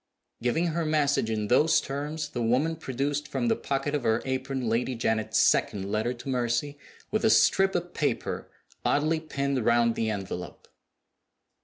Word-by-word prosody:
Giving 125 Hz, +8 st, +1 dB
her 170 Hz, +1 st, 0 dB
message 145 Hz, -6 st, +1 dB
in 105 Hz, -1 st, -1 dB
those 155 Hz, +7 st, +4 dB
terms, 150 Hz, +2 st, -4 dB
the 120 Hz, -, -4 dB
woman 130 Hz, +8 st, +1 dB
produced 145 Hz, 0 st, -2 dB
from 235 Hz, +10 st, -1 dB
the 225 Hz, -, +3 dB
pocket 140 Hz, -3 st, -2 dB
of 145 Hz, -, 0 dB
her 115 Hz, -1 st, +1 dB
apron 130 Hz, -1 st, -2 dB
Lady 120 Hz, +3 st, 0 dB
Janet's 110 Hz, -1 st, 0 dB
second 100 Hz, -1 st, +2 dB
letter 110 Hz, +3 st, 0 dB
to 125 Hz, +2 st, -9 dB
Mercy, 125 Hz, +3 st, -1 dB, 0.3 s
with 215 Hz, +1 st, 0 dB
a 225 Hz, -, +5 dB
strip 195 Hz, -3 st, +4 dB
of 175 Hz, 0 st, -2 dB
paper 150 Hz, -, -2 dB, 0.3 s
oddly 155 Hz, +2 st, +2 dB
pinned 140 Hz, -5 st, -2 dB
round 115 Hz, 0 st, +3 dB
the 115 Hz, -1 st, -1 dB
envelope. 95 Hz, -4 st, -6 dB
135 Hz, 160 wpm, -27 LUFS, 115-150 Hz, 0.3 s, a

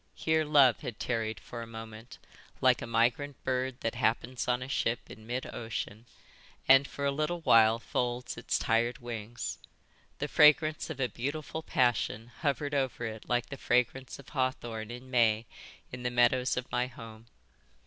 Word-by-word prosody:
Here 160 Hz, 0 st, +1 dB
love 145 Hz, -5 st, +5 dB
had 125 Hz, -7 st, -7 dB
tarried 115 Hz, -3 st, -2 dB
for 120 Hz, -, -8 dB
a 115 Hz, -, -7 dB
moment 110 Hz, +1 st, -9 dB, 0.4 s
like -, -, +4 dB
a -, -, -5 dB
migrant 120 Hz, +5 st, 0 dB
bird 130 Hz, 0 st, -1 dB
that 115 Hz, -, -1 dB
happens 120 Hz, +1 st, -1 dB
on 125 Hz, 0 st, +1 dB
a -, -, -7 dB
ship 120 Hz, -3 st, 0 dB
in 110 Hz, 0 st, -12 dB
mid 125 Hz, +2 st, -3 dB
ocean 110 Hz, 0 st, -5 dB, 0.6 s
and 135 Hz, +1 st, +7 dB
for 140 Hz, -, -4 dB
a 140 Hz, -, +2 dB
little 155 Hz, +4 st, -2 dB
while 115 Hz, -6 st, +6 dB
folds 120 Hz, +1 st, -2 dB
its 115 Hz, -3 st, -1 dB
tired 115 Hz, +7 st, +1 dB
wings. 120 Hz, -2 st, -5 dB, 0.6 s
The 150 Hz, -, -2 dB
fragrance 155 Hz, +1 st, +4 dB
of 155 Hz, -4 st, -6 dB
a 130 Hz, -, +2 dB
beautiful 145 Hz, +6 st, -4 dB
passion 120 Hz, -4 st, 0 dB
hovered 145 Hz, -1 st, -1 dB
over 130 Hz, -4 st, -1 dB
it 110 Hz, -1 st, -7 dB
like 120 Hz, 0 st, 0 dB
the 140 Hz, -, -6 dB
fragrance 125 Hz, +1 st, 0 dB
of 140 Hz, -2 st, -14 dB
hawthorn 120 Hz, -5 st, -2 dB
in 125 Hz, +2 st, -9 dB
May 115 Hz, -2 st, +3 dB, 0.5 s
in 125 Hz, -, -7 dB
the 125 Hz, -, -1 dB
meadows 125 Hz, +1 st, +3 dB
of 125 Hz, 0 st, -4 dB
my 125 Hz, +1 st, +1 dB
home. 115 Hz, -2 st, -12 dB
125 Hz, 170 wpm, -30 LUFS, 115-135 Hz, 0.6 s, and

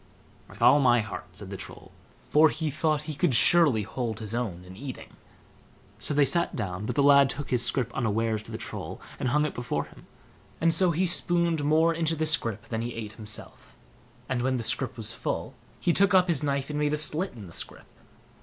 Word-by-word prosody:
"With -, -, -6 dB
all 145 Hz, -, +7 dB
my 120 Hz, -4 st, +4 dB
heart", 110 Hz, -1 st, -7 dB
said -, -, -8 dB
the -, -, -5 dB
Troll, -, -, -11 dB, 0.4 s
for 155 Hz, +1 st, +6 dB
he 155 Hz, -1 st, -3 dB
thought 155 Hz, +1 st, 0 dB
he 155 Hz, 0 st, -5 dB
could 150 Hz, -3 st, +1 dB
surely 130 Hz, -2 st, +4 dB
hold 115 Hz, 0 st, -4 dB
his 110 Hz, -1 st, -7 dB
own 105 Hz, -8 st, -3 dB
in 90 Hz, 0 st, -12 dB
eating. 130 Hz, +4 st, -9 dB, 0.9 s
So 145 Hz, -, -2 dB
they 145 Hz, -1 st, +5 dB
sat 170 Hz, +4 st, +2 dB
down; 95 Hz, +1 st, -4 dB
but -, -, -3 dB
the 140 Hz, -, +3 dB
lad 140 Hz, -1 st, +6 dB
took 145 Hz, +1 st, -5 dB
his 125 Hz, -2 st, +3 dB
scrip 120 Hz, -1 st, 0 dB
unawares 110 Hz, -2 st, -1 dB
to -, -, -13 dB
the -, -, -4 dB
Troll, -, -, -7 dB, 0.2 s
and 125 Hz, -, -1 dB
hung 150 Hz, +4 st, +2 dB
it 150 Hz, -, -3 dB
before 120 Hz, -11 st, -3 dB
him, -, -, -17 dB, 0.5 s
and 165 Hz, 0 st, +3 dB
so 180 Hz, +2 st, +4 dB
he 170 Hz, +3 st, +1 dB
spooned 170 Hz, -2 st, +1 dB
more 160 Hz, +3 st, +3 dB
into 165 Hz, 0 st, 0 dB
the 160 Hz, 0 st, -1 dB
scrip 115 Hz, -8 st, 0 dB
than 110 Hz, -1 st, -2 dB
he 120 Hz, 0 st, -5 dB
ate 110 Hz, -2 st, -6 dB
himself; 110 Hz, -2 st, -5 dB, 0.5 s
and 130 Hz, -2 st, -1 dB
when 130 Hz, +1 st, 0 dB
the 115 Hz, -, -4 dB
scrip -, -, +1 dB
was -, -, 0 dB
full, -, -, -4 dB, 0.3 s
he 175 Hz, -, +1 dB
took 195 Hz, +1 st, +4 dB
up 185 Hz, 0 st, +5 dB
his 165 Hz, -5 st, +3 dB
knife 140 Hz, -1 st, -2 dB
and 150 Hz, -, -3 dB
made 150 Hz, 0 st, 0 dB
a -, -, +1 dB
slit 155 Hz, +5 st, -1 dB
in 110 Hz, -4 st, -10 dB
the 85 Hz, -, -12 dB
scrip. -, -, -4 dB
140 Hz, 220 wpm, -27 LUFS, 115-155 Hz, 0.9 s, all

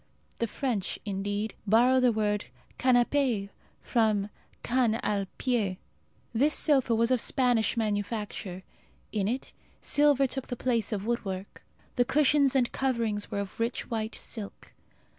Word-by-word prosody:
The 230 Hz, -, 0 dB
French, 225 Hz, -5 st, -2 dB
indeed, 205 Hz, +2 st, -2 dB
borrow 245 Hz, +5 st, +5 dB
their 250 Hz, -1 st, +4 dB
word 210 Hz, -2 st, 0 dB, 0.3 s
canapé 245 Hz, -4 st, +2 dB, 0.3 s
from 215 Hz, -3 st, +1 dB, 0.3 s
can 235 Hz, -2 st, +2 dB
al 200 Hz, -2 st, 0 dB
pié. 215 Hz, -8 st, 0 dB, 0.6 s
This 285 Hz, +7 st, +3 dB
sofa 265 Hz, -6 st, +3 dB
was 230 Hz, +2 st, +2 dB
of 255 Hz, -3 st, +3 dB
Spanish 245 Hz, -5 st, +1 dB
manufacture. 205 Hz, -3 st, -3 dB, 0.5 s
In 200 Hz, -3 st, 0 dB
it 250 Hz, +4 st, -3 dB, 0.3 s
silver 290 Hz, -2 st, +3 dB
took 265 Hz, 0 st, -4 dB
the 245 Hz, -, -3 dB
place 235 Hz, -3 st, 0 dB
of 205 Hz, -2 st, -2 dB
woodwork. 200 Hz, -5 st, -4 dB, 0.3 s
The 245 Hz, -, +4 dB
cushions 285 Hz, -1 st, +3 dB
and 250 Hz, -3 st, +2 dB
coverings 230 Hz, -6 st, -1 dB
were 200 Hz, -, -2 dB
of 200 Hz, +2 st, -8 dB
rich 230 Hz, +2 st, -2 dB
white 220 Hz, -1 st, -2 dB
silk. 210 Hz, -3 st, -7 dB
230 Hz, 135 wpm, -28 LUFS, 205-255 Hz, 0.6 s, borrow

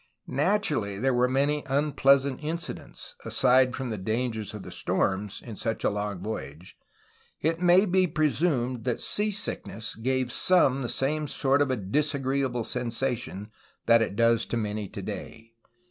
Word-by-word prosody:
Natur 160 Hz, +4 st, +1 dB
ally, 100 Hz, -2 st, -3 dB
there 130 Hz, +5 st, +1 dB
were 125 Hz, +1 st, +2 dB
many 140 Hz, +3 st, +1 dB
unpleasant 140 Hz, -1 st, +2 dB
incidents, 165 Hz, +3 st, -5 dB
aside 130 Hz, -1 st, +3 dB
from 130 Hz, -3 st, -4 dB
the 110 Hz, -, -4 dB
dangers 110 Hz, +1 st, -2 dB
of 105 Hz, -, -7 dB
the -, -, -9 dB
storms, 100 Hz, +1 st, -1 dB
in 115 Hz, -3 st, -7 dB
such 115 Hz, +2 st, -3 dB
a -, -, +2 dB
long 100 Hz, -2 st, -4 dB
voyage. 85 Hz, -6 st, -6 dB, 0.6 s
It 165 Hz, +2 st, 0 dB
may 180 Hz, +3 st, +6 dB
be 185 Hz, -1 st, +3 dB
presumed 150 Hz, -6 st, 0 dB
that 125 Hz, -2 st, 0 dB
sea 210 Hz, +1 st, 0 dB
sickness 195 Hz, -, -3 dB
gave 130 Hz, +2 st, -1 dB
some 140 Hz, -7 st, +3 dB
the 120 Hz, -, -3 dB
same 150 Hz, +3 st, 0 dB
sort 140 Hz, 0 st, +2 dB
of 145 Hz, -, +2 dB
a 130 Hz, -, +1 dB
disagreeable 135 Hz, +2 st, 0 dB
sensation 120 Hz, -4 st, -3 dB, 0.3 s
that 115 Hz, -1 st, +5 dB
it 105 Hz, -3 st, -1 dB
does 115 Hz, 0 st, +3 dB
to 120 Hz, -, -2 dB
many 105 Hz, -2 st, -3 dB
today. 115 Hz, 0 st, -7 dB
130 Hz, 155 wpm, -27 LUFS, 110-145 Hz, 0.6 s, may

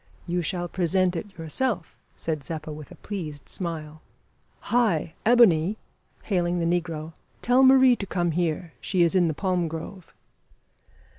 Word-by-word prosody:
"You 175 Hz, 0 st, -1 dB
shall 175 Hz, +1 st, -2 dB
present 180 Hz, +1 st, +1 dB
it 190 Hz, +2 st, -6 dB
yourself," 175 Hz, -, -2 dB, 0.2 s
said 155 Hz, -3 st, -3 dB
Zeppa, 155 Hz, 0 st, -6 dB
with 150 Hz, -2 st, -10 dB
a -, -, -12 dB
pleased 160 Hz, -8 st, -7 dB
smile. 155 Hz, -3 st, -6 dB, 0.6 s
"Hi! 200 Hz, -10 st, +1 dB
Ebony," 210 Hz, -6 st, +5 dB, 0.5 s
hailing 175 Hz, -3 st, 0 dB
the 170 Hz, -, 0 dB, 0.2 s
negro, 160 Hz, -1 st, -7 dB, 0.3 s
"tell 250 Hz, +2 st, +4 dB
Marie 260 Hz, -2 st, +7 dB
to 200 Hz, -, -5 dB
come 175 Hz, -2 st, 0 dB
here. 165 Hz, 0 st, -2 dB
She 185 Hz, -3 st, +2 dB
is 170 Hz, -, +2 dB
in 180 Hz, -2 st, +4 dB
the 160 Hz, -, -1 dB
palm 180 Hz, -2 st, 0 dB
grove." 165 Hz, +3 st, -8 dB
175 Hz, 145 wpm, -25 LUFS, 160-195 Hz, 0.6 s, Marie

